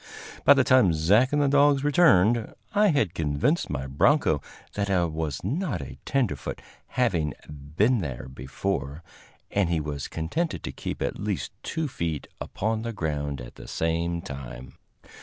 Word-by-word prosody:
By -, -, +8 dB
the -, -, +4 dB
time 125 Hz, -9 st, +5 dB
Zach 100 Hz, +11 st, +3 dB
and 145 Hz, -, +2 dB
the 145 Hz, -, +3 dB
dogs 140 Hz, 0 st, +4 dB
returned, 120 Hz, -, +4 dB, 0.2 s
I 210 Hz, +1 st, +4 dB
had 125 Hz, -, +2 dB
convinced 80 Hz, -, 0 dB
my 65 Hz, -, -3 dB
broncho 75 Hz, -, +3 dB, 0.3 s
that 100 Hz, -1 st, -2 dB
I 90 Hz, -3 st, +3 dB
was 80 Hz, -3 st, -3 dB
not 155 Hz, -, -1 dB
a -, -, -8 dB
tenderfoot, 135 Hz, -7 st, -1 dB, 0.3 s
having 90 Hz, -, 0 dB, 0.4 s
"been 120 Hz, +4 st, +4 dB
there 65 Hz, -8 st, -5 dB
before," 70 Hz, +4 st, -4 dB, 0.5 s
and 100 Hz, -4 st, +1 dB
he 85 Hz, -2 st, +1 dB
was 75 Hz, -2 st, -4 dB
contented 120 Hz, -, -2 dB
to -, -, -4 dB
keep -, -, -5 dB
at -, -, -3 dB
least -, -, -2 dB
two 160 Hz, -2 st, -2 dB
feet 80 Hz, -, -3 dB
upon 110 Hz, +2 st, -2 dB
the 115 Hz, 0 st, -4 dB
ground 75 Hz, -, -3 dB
at -, -, -11 dB
the -, -, -10 dB
same 85 Hz, +1 st, -1 dB
time. 65 Hz, -5 st, -8 dB
90 Hz, 160 wpm, -26 LUFS, -, 0.5 s, By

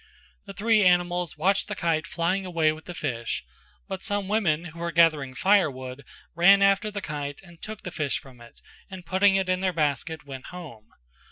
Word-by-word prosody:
The 195 Hz, -, -7 dB
three 215 Hz, +2 st, +3 dB
animals 175 Hz, -2 st, +2 dB
watched 195 Hz, +5 st, +1 dB
the 210 Hz, -, -4 dB
kite 165 Hz, -3 st, 0 dB
flying 180 Hz, +4 st, -1 dB
away 165 Hz, -4 st, +1 dB
with 155 Hz, +1 st, -9 dB
the 175 Hz, -, -8 dB
fish; 120 Hz, -9 st, -3 dB, 0.4 s
but 190 Hz, -1 st, -5 dB
some 205 Hz, -1 st, -2 dB
women 180 Hz, -6 st, +1 dB
who 170 Hz, -, -11 dB
were 170 Hz, 0 st, -2 dB
gathering 155 Hz, -6 st, +3 dB
firewood 140 Hz, -9 st, +1 dB, 0.3 s
ran 195 Hz, +4 st, +6 dB
after 195 Hz, +2 st, +3 dB
the 205 Hz, -1 st, -5 dB
kite 145 Hz, -2 st, -5 dB
and 170 Hz, -3 st, -17 dB
took 215 Hz, -1 st, -8 dB
the 180 Hz, -, -6 dB
fish 150 Hz, -5 st, -1 dB
from 130 Hz, -3 st, -14 dB
it 120 Hz, -, -16 dB, 0.3 s
and 185 Hz, -2 st, -9 dB
putting 190 Hz, +3 st, +3 dB
it 190 Hz, -1 st, +1 dB
in 185 Hz, 0 st, +1 dB
their 185 Hz, -1 st, 0 dB
basket 155 Hz, 0 st, -1 dB
went 135 Hz, -2 st, -9 dB
home. 150 Hz, -12 st, -10 dB
170 Hz, 190 wpm, -26 LUFS, 150-190 Hz, 0.4 s, ran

